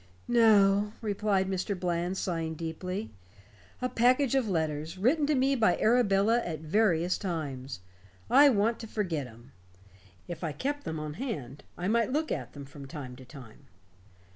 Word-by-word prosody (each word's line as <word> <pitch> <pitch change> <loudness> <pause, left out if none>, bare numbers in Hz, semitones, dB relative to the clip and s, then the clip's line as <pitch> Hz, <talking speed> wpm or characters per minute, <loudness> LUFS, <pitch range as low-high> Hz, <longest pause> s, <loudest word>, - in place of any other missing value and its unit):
"No," 210 -3 +4
replied 205 -3 0
Mr. 190 0 -2
Bland, 175 +1 -1
sighing 165 -4 -2
deeply. 180 +6 -5 0.7
"A - - +2
package 255 +2 +2
of 260 -5 +1
letters, 160 -2 -2
written 285 - +2
to 300 - +2
me 270 +1 +2
by 230 -4 +3
Arabella 225 -1 +3
at 160 -9 -5
various 175 0 +1
times. 140 - -4 0.5
I 285 - +7
want 225 0 +1
to 225 - -7
forget 175 - -2
'em. 120 +3 -16 0.8
If 175 0 -7
I 160 -3 -2
kept 285 - -3
them 160 -1 -3
on 150 -1 -5
hand, 145 - -5
I 180 - -3
might 230 +2 +2
look 310 +3 -1
at - - -4
them 140 -1 -9
from 140 0 -11
time 135 -3 -8
to 130 - -12
time. 125 -4 -14
190 Hz, 160 wpm, -29 LUFS, 155-230 Hz, 0.8 s, I